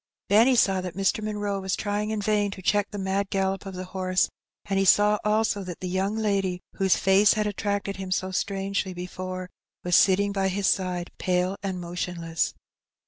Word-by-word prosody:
Benny 230 +6 +5
saw 195 -5 +3
that 180 -2 -6
Mr. 195 +2 0
Munroe 205 -2 -2
was 190 0 -1
trying 210 0 -2
in 215 -1 -2
vain 210 -1 +1
to 195 -1 -8
check 205 +2 +2
the 205 - -7
mad 195 0 -1
gallop 195 0 -1
of 190 - -7
the 185 - -5
horse, 185 -1 +1 0.4
and 195 -1 0
he - - +3
saw 210 +2 +5
also 210 -1 +1
that 180 -2 -7
the 185 - -4
young 190 +3 -1
lady 195 -4 0 0.2
whose 190 -2 +3
face 195 +2 +4
had 215 -1 0
attracted 200 -1 -2
him 190 -1 -6
so 185 0 -1
strangely 195 0 -2
before 185 +1 -5 0.4
was 180 -1 +2
sitting 200 +1 +4
by 195 -1 0
his 195 +1 -1
side, 180 -2 0
pale 180 +1 0
and 190 -2 -3
motionless. 170 -2 -3
195 Hz, 190 wpm, -26 LUFS, 185-205 Hz, 0.4 s, Benny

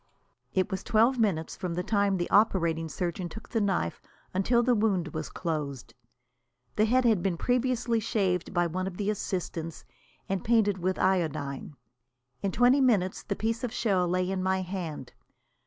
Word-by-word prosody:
It 185 +1 +1
was 190 0 -3
twelve 235 +3 +3
minutes 185 -8 0
from 175 -2 -4
the 180 - -1
time 200 -1 +1
the 175 - -1
operating 170 -6 +3
surgeon 175 +3 -3
took 220 +7 -10
the 225 - 0
knife 190 - -1 0.3
until 235 +6 +2
the 250 +1 +3
wound 200 -7 +1
was 155 0 -5
closed. 145 -8 -4 0.8
The 215 - +3
head 250 +3 +3
had 220 -6 +4
been 180 -2 0
previously 245 0 +1
shaved 190 -5 0
by 175 -1 +2
one 185 +3 -2
of 180 -2 -6
the 205 0 0
assistants, 170 -5 -4 0.4
and 195 -1 -2
painted 215 -4 +2
with 185 +1 -1
iodine. 155 -7 -1 0.7
In 195 - 0
twelve 250 +5 +4
minutes 205 -8 +2
the 200 - -3
piece 225 +4 -2
of 245 - -2
shell 195 -7 +1
lay 180 +1 0
in 190 -1 -1
my 190 0 +1
hand. 175 -8 -5
190 Hz, 170 wpm, -28 LUFS, 175-220 Hz, 0.8 s, had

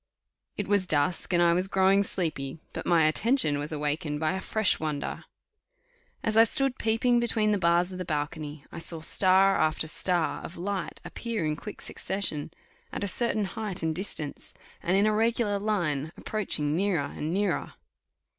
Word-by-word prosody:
It 205 - -2
was 200 -2 +2
dusk, 155 +4 +1
and 175 -1 +4
I 170 0 +5
was 180 +2 +1
growing 195 +1 +4
sleepy, 155 -8 -1 0.2
but - - -5
my 170 -2 +5
attention 155 - +2
was 145 +2 -4
awakened 150 0 -2
by 155 0 +1
a 190 - -3
fresh 220 0 +1
wonder. 150 -2 -3 1.0
As 220 - 0
I 225 - +9
stood 265 +3 +2
peeping 235 +2 +2
between 220 -2 +1
the 205 - +1
bars 175 +1 +2
of 185 - -7
the - - -2
balcony, 150 -2 -4
I - - -7
saw 165 -1 -2
star 190 +3 +4
after 155 0 +1
star 175 +1 0
of 170 - -9
light 190 +1 -3
appear 230 -7 -3
in 155 0 0
quick 205 +6 -9
succession, 190 -7 -3 0.4
at - - -4
a - - 0
certain 215 0 0
height 195 -1 -5
and 160 0 +1
distance, 160 -5 -3 0.3
and 185 +3 +1
in 200 - +4
a 215 - +3
regular 225 -2 +1
line, 165 -8 -1
approaching 155 -8 -1
nearer 180 -5 +1
and 155 +2 -3
nearer. 200 +3 -1
185 Hz, 175 wpm, -28 LUFS, 155-205 Hz, 1.0 s, I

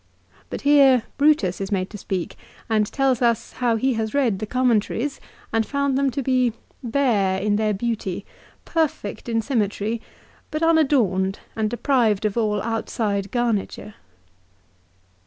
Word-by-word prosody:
But - - -5
here 275 -4 +5 0.2
Brutus 280 -12 +3
is 195 - -4
made 185 -2 -1
to 210 - -7
speak, 185 -2 -4 0.3
and 215 -2 +2
tells 270 -3 +1
us, 235 -2 +1
how 240 -2 0
he 260 +4 +1
has 220 +2 -2
read 240 -9 +2
the 215 - -4
commentaries 250 +2 0 0.3
and 225 0 +3
found 280 +2 -1
them 275 0 +2
to 275 +1 -3
be 255 -2 +2 0.2
" - - -35
bare 225 -7 +1
in 205 +1 +1
their 215 0 +1
beauty, 205 -3 -3 0.4
perfect 305 -10 -2
in 225 -1 0
sym 260 0 0
metry, 210 +2 -2 0.5
but 310 +1 -3
unadorned, 250 - +2 0.2
and 220 -1 0
deprived 235 -4 +1
of 210 - 0
all 210 -3 0
outside 215 -3 -2
garniture." 225 -2 -2
225 Hz, 150 wpm, -23 LUFS, 210-265 Hz, 0.5 s, here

